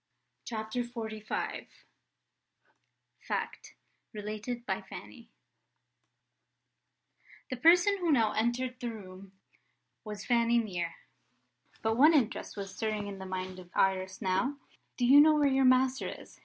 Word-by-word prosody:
CHAPTER 220 +1 -3
XLV 220 -3 -6 1.9
FACT: - - -4 0.4
RELATED 215 +3 -5
BY - - -2
FANNY - - -11 2.2
THE 255 - -2
person 355 +8 +5
who 345 -3 +1
now 225 -6 +3
entered 245 +3 -1
the 240 - -3
room 195 -3 -10 0.7
was 210 -2 -7
Fanny 235 -1 +3
Mere. 180 -7 -2 0.9
But 220 0 +1
one 305 +5 +7
interest 235 -5 0
was 195 -1 -6
stirring 215 -2 -2
in 200 -1 -7
the 190 - -7
mind 185 0 -5
of 180 -1 -13
Iris 190 +1 +1
now. 200 +10 0 0.4
"Do 245 - +1
you 275 +4 +8
know 310 +1 +6
where 295 -1 +3
your 270 -1 +3
master 255 +1 +3
is?" - - -11
225 Hz, 125 wpm, -30 LUFS, 200-255 Hz, 2.2 s, you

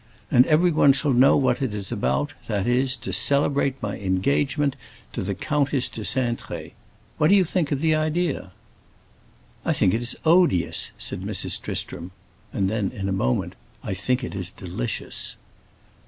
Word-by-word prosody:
And 125 +2 +6
everyone 155 -3 +4
shall 140 0 +1
know 125 +2 +5
what 130 -1 +1
it 125 -6 -1
is 100 -2 -6
about, 65 +3 -1
that 100 -2 -1
is, 125 +2 +2
to 120 - -6
celebrate 140 -1 +1
my 100 - -3
engagement 140 +9 0 0.4
to - - -3
the 95 +1 -2
Countess 145 +3 0
de 110 - -7
Cintré. 120 +1 -2 0.5
What 155 - +4
do 200 - +6
you 190 -2 +4
think 165 -3 -1
of 140 -1 0
the 160 -1 +3
idea?" 155 - -1 1.1
"I - - +1
think 90 - +2
it 115 - 0
is 120 +1 -1
odious!" 165 - +3
said - - -3
Mrs. - - -1
Tristram. 85 +2 -4 0.4
And 95 - 0
then 105 -1 -1
in 100 -5 -4
a - - -1
moment: 65 -10 0 0.3
"I - - -3
think 125 +7 -1
it - - -5
is 95 -3 -3
delicious!" 90 -10 -4
130 Hz, 165 wpm, -24 LUFS, 100-145 Hz, 1.1 s, And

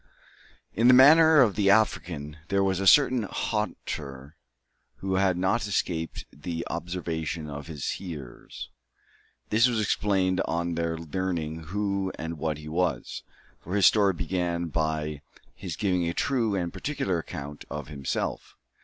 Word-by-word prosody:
In 115 +5 +3
the 125 - +8
manner 155 +3 +8
of 110 -6 +4
the 100 -2 +2
African 85 -8 +1
there 100 0 +1
was 95 -1 +1
a 95 - 0
certain 130 0 +6
hauteur 75 - -4 0.6
which 95 -1 -1
had 95 -2 +2
not 100 +5 +1
escaped 85 -4 -2
the 85 +3 -5
observation 85 -2 -4
of 75 0 -7
his 75 -5 -5
hearers. 70 -7 -8 0.8
This 115 +3 +5
was 120 -3 0
explained 95 -3 +1
on 85 +1 -1
their 85 0 -2
learning 80 -1 -3
who 100 +1 -1
and 80 -1 -5
what 80 -1 -1
he 75 0 -10
was; 90 +3 -2 0.4
for 90 - -5
his 100 -3 +4
story 100 0 +5
began 85 -1 -2
by 80 -2 -2 0.3
his - - -6
giving 90 -4 0
a 85 - -4
true 115 -6 0
and 85 -3 -2
particular 95 - -2
account 75 -2 -8
of 75 -2 -6
himself. 70 -3 -4
90 Hz, 145 wpm, -27 LUFS, 80-100 Hz, 0.8 s, the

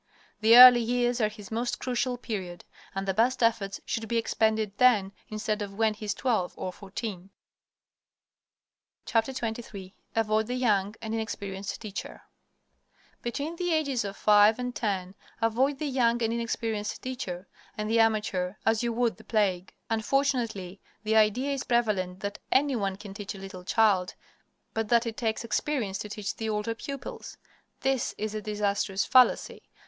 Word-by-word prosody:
The 225 +2 +7
early 250 -1 +11
years 245 +1 0
are 215 - +3
his 210 -1 -12
most 235 +2 -2
crucial 250 0 -1
period, 190 -7 -6 0.3
and 195 0 -3
the 195 - +1
best 240 +5 +2
efforts 215 -4 +1
should 225 -1 -3
be 235 - 0
expended 220 -2 +1
then 215 -6 +4 0.2
instead 215 0 -2
of 200 -1 -5
when 220 0 +2
he 215 0 -9
is 205 -1 -1
twelve 220 -9 0
or 185 - -4
fourteen. 195 -1 -6 1.8
XXIII 225 -5 -2 0.2
AVOID 220 -1 +1
THE 250 - -2
YOUNG 210 -5 +1
AND 220 0 -3
INEXPERIENCED 200 -3 -4
TEACHER 210 -3 -7 1.0
Between 285 +7 -4
the 355 0 -1
ages 280 -7 +1
of 200 -1 -6
five 210 +1 +5
and 250 0 -4
ten 190 -4 -2 0.3
avoid 250 +5 +1
the 305 - -3
young 240 -4 +1
and 225 0 +1
inexperienced 225 -2 -3
teacher 195 -8 -5 0.3
and 210 0 -2
the 225 +1 +2
amateur 210 -4 +1
as 225 0 +3
you 235 -1 0
would 235 0 0
the 220 - -15
plague. 200 -4 0 0.2
Unfortunately, 225 -6 0 0.2
the 220 +1 +1
idea 220 +6 +3
is 275 - -3
prevalent 200 -6 0
that 200 0 -4
any 275 0 +3
one 195 -4 -1
can 200 0 -10
teach 200 0 -6
a - - -9
little 190 -1 -9
child, 195 -3 +2 0.6
but 225 -2 -2
that 235 0 +4
it 225 -1 -4
takes 220 -1 -1
experience 230 -5 -1
to 210 - -6
teach 205 -1 -4
the 225 -1 -3
older 210 +1 -1
pupils. 275 +4 -7 0.4
This 270 -2 0
is 215 0 -3
a 215 - -3
disastrous 205 -2 -1
fallacy. 255 -1 +4
220 Hz, 160 wpm, -28 LUFS, 200-240 Hz, 1.8 s, early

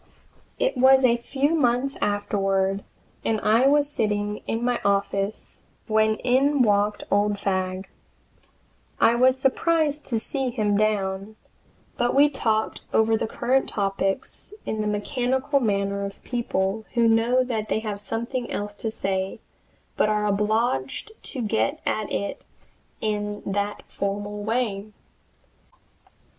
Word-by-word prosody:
It - - +1
was 265 +1 +6
a 235 -1 +5
few 275 +5 0
months 270 -2 +1
afterward 195 -1 0 0.4
and 220 -1 0
I 230 +5 +4
was 290 0 +4
sitting 210 -6 -1
in 225 +1 -1
my 245 -1 0
office 200 +1 -1 0.2
when 220 -1 +2
in 260 +4 +2
walked 205 -1 +2
old 205 +1 +3
Fagg. 185 -1 -2 1.1
I 230 - +5
was 255 +2 +4
surprised 300 +3 +1
to 235 - 0
see 265 +3 0
him 215 -4 0
down, 200 -1 0 0.6
but 240 +1 +1
we 290 +2 +6
talked 220 -6 -1
over 220 0 +3
the 220 - -1
current 255 +4 +1
topics 195 - -2
in 220 - -2
that 210 - -1
mechanical 255 +6 0
manner 200 -3 0
of 200 0 -7
people 220 -4 -1
who 235 -1 +4
know 230 +3 +3
that 220 -4 -3
they 220 - 0
have 210 -2 -4
something 235 +4 -3
else 205 0 -4
to 225 - -3
say, 190 -3 -2 0.6
but 215 - +3
are 210 0 +1
obliged 210 - 0
to 255 -4 -4
get 115 - 0
at 215 -1 -1
it 200 - -3 0.6
in 210 -1 -2
that 200 +1 -2
formal 205 +1 -4
way. 215 -2 -2
215 Hz, 130 wpm, -24 LUFS, 200-250 Hz, 1.1 s, was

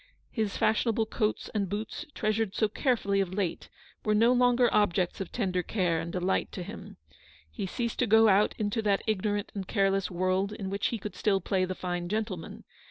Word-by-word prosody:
His 220 -4 -2
fashionable 225 0 +2
coats 215 0 -2
and 200 -4 -1
boots, 210 +2 -4
treasured 215 -1 0
so 215 - +2
care 245 +4 +1
fully 200 -2 +1
of 185 -1 -3
late, 190 -5 -2 0.3
were 215 -1 +2
no 230 +3 +5
longer 245 0 +4
objects 185 -3 +1
of 190 - -5
tender 185 -6 0
care 175 -3 0
and 165 +1 -4
delight 180 +2 0
to 185 - -4
him. 205 +5 -9 0.5
He 200 -3 -4
ceased 235 +4 -3
to 250 - +2
go 220 +1 +6
out 205 +1 +4
into 210 +1 -1
that 205 -2 +1
ignorant 205 -1 -1
and 195 -2 -5
careless 195 -2 +1
world 185 +3 0
in 195 -2 -5
which 200 - 0
he 230 - -2
could 210 0 -6
still 200 -2 +2
play 185 0 0
the 185 0 -4
fine 175 -1 -3
gentleman. 210 -5 -4
205 Hz, 195 wpm, -29 LUFS, 185-220 Hz, 0.5 s, go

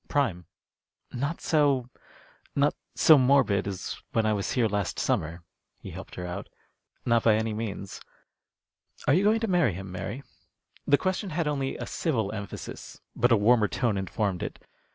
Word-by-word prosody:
"Prime." 110 - 0 0.7
"Not 140 +7 -2
so 140 -6 +2 0.3
" - - -30
"Not 145 +1 +3 0.2
so 155 -3 +7
morbid 125 -7 +3
as 95 -2 -5
when 115 - +2
I 110 - +3
was 100 -2 -2
here 120 -3 +3
last 100 -3 -2
summer," 85 +2 -1 0.3
he - - -9
helped - - -9
her 90 - -5
out. 90 +3 -6 0.6
"Not 115 -1 +3
by 110 -1 +4
any 110 0 -1
means. 105 -3 -5 1.1
Are - - +5
you 180 +6 +4
going 220 +2 +3
to 225 - 0
marry 175 - +3
him, 95 +1 -7
Mary?" 120 +8 -5 0.6
The 145 - +6
question 185 +3 -1
had 160 -1 -1
only 140 -2 -1
a - - -5
civil 115 - -1
emphasis, 100 -2 -7 0.2
but 120 +1 +2
a 115 - +6
warmer 110 +1 +4
tone 115 0 0
informed 95 -1 -2
it. - - -4
115 Hz, 170 wpm, -27 LUFS, 100-140 Hz, 1.1 s, so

